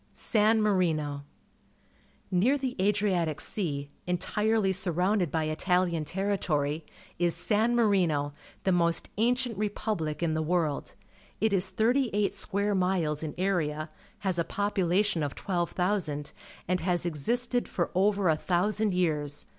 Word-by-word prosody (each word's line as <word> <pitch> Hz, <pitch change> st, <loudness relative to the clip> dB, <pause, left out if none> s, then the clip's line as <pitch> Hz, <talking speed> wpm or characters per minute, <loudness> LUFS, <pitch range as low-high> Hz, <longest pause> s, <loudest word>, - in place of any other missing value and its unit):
San 220 Hz, 0 st, +2 dB
Marino. 155 Hz, -8 st, 0 dB, 0.5 s
— -, -, -35 dB, 0.3 s
Near 220 Hz, +11 st, +3 dB
the 260 Hz, -2 st, -3 dB
Adriatic 190 Hz, -6 st, +1 dB
Sea, 145 Hz, -8 st, -2 dB, 0.2 s
entirely 210 Hz, +3 st, +1 dB
surrounded 185 Hz, 0 st, +1 dB
by 160 Hz, +1 st, 0 dB
Itahan 170 Hz, 0 st, 0 dB
territory, 165 Hz, -6 st, -1 dB, 0.3 s
is 175 Hz, -1 st, +2 dB
San__AJjjimp, 205 Hz, -10 st, +2 dB, 0.3 s
the 190 Hz, -, +2 dB
most 170 Hz, -2 st, +2 dB
ancient 240 Hz, -2 st, +1 dB
repubhc 200 Hz, -7 st, -2 dB
in 160 Hz, -2 st, +1 dB
the 160 Hz, -, 0 dB
world. 160 Hz, -3 st, -1 dB, 0.4 s
It 220 Hz, -1 st, +2 dB
is 190 Hz, -1 st, +1 dB
thirty 235 Hz, +6 st, +2 dB
eight 205 Hz, -1 st, +1 dB
square 205 Hz, 0 st, -1 dB
miles 180 Hz, -5 st, 0 dB
in 155 Hz, -2 st, -5 dB
area, 155 Hz, -5 st, -1 dB, 0.3 s
has 190 Hz, -4 st, 0 dB
a -, -, +3 dB
population 195 Hz, -1 st, +1 dB
of 145 Hz, -2 st, -2 dB
12.000. 175 Hz, -4 st, -1 dB, 0.3 s
and 180 Hz, +1 st, +1 dB
has 175 Hz, +1 st, 0 dB
existed 240 Hz, -, 0 dB
for 170 Hz, -, -2 dB
over 195 Hz, +1 st, +2 dB
a 160 Hz, -, +4 dB
thousand 190 Hz, +5 st, 0 dB
years. 150 Hz, -5 st, 0 dB
180 Hz, 130 wpm, -28 LUFS, 160-205 Hz, 0.5 s, a